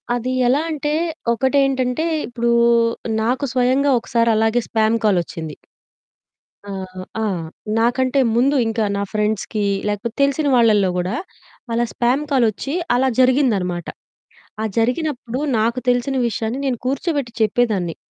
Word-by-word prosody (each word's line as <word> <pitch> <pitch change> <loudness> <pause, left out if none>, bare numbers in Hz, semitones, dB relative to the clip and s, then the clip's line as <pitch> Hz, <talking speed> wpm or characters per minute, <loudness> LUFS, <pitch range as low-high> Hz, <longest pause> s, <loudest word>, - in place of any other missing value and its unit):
అది 245 +1 -2 0.2
ఎలా 270 +5 +3
అంటే, 295 0 -2 0.4
ఒకటి 265 +4 +1
ఏంటంటే 260 +3 0 0.2
ఇప్పుడు 235 -1 -1 0.7
నాకు 250 +5 0
స్వయంగా 260 +3 +2
ఒకసారి 235 0 +1
అలాగే 225 +2 +2
స్పామ్ 220 0 +2
కాలొచ్చింది. 170 -5 -1 1.1
ఆహ్ 185 -1 -7 0.2
ఆ! - - 0 0.6
నాకంటే 255 +3 +1 0.2
ముందు 270 +4 +3
ఇంకా 225 -1 0
నా 200 - -1
ఫ్రెండ్స్‌కి, 210 0 -1 0.2
లేకపోతే 210 +3 -3
తెలిసిన 280 +2 +1
వాళ్ళలో 215 -5 +4
కూడా, 180 +4 -1 0.6
అలా 235 - +1
స్పామ్ 250 +4 +1
కాలొచ్చి 255 +2 +1 0.2
అలా 265 +2 +2
జరిగిందనమాట. 220 - +2 0.7
ఆ - - -1
జరిగినప్పుడు 250 0 -1 0.2
నాకు 230 +3 +1
తెలిసిన 245 +2 +1
విషయాన్ని 230 +3 -3
నేను 255 -3 0
కూర్చోబెట్టి 275 -1 -1
చెప్పేదాన్ని. 215 -6 +1
240 Hz, 120 wpm, -20 LUFS, 215-260 Hz, 1.1 s, వాళ్ళలో